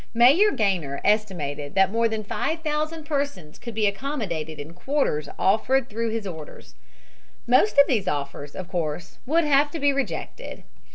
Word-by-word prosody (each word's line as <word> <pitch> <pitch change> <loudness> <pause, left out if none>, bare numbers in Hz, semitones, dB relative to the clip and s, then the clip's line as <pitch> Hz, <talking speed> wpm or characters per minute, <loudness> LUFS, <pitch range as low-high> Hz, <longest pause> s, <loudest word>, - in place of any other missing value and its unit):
Mayor 280 - +6
Gaynor 180 - 0
estimated 155 -10 0
that 195 0 +4
more 230 +1 +2
than 220 -1 -3
5000 310 +5 -2
persons 280 - -3
could 235 -2 -8
be 215 -1 +2
accommodated 200 - -3
in 150 +3 -8
quarters 180 - -1
offered 240 +6 +2
through 230 +2 -1
his 220 -1 -3
orders. 160 -5 -9 0.7
Most 255 - +3
of 280 - +9
these 220 -8 0
offers 145 0 -4
of 185 - -6
course 165 -2 -4
would 330 +4 +3
have 290 -1 +4
to 325 - -5
be 285 0 +3
rejected. 275 -1 -4
220 Hz, 155 wpm, -24 LUFS, 170-280 Hz, 0.7 s, of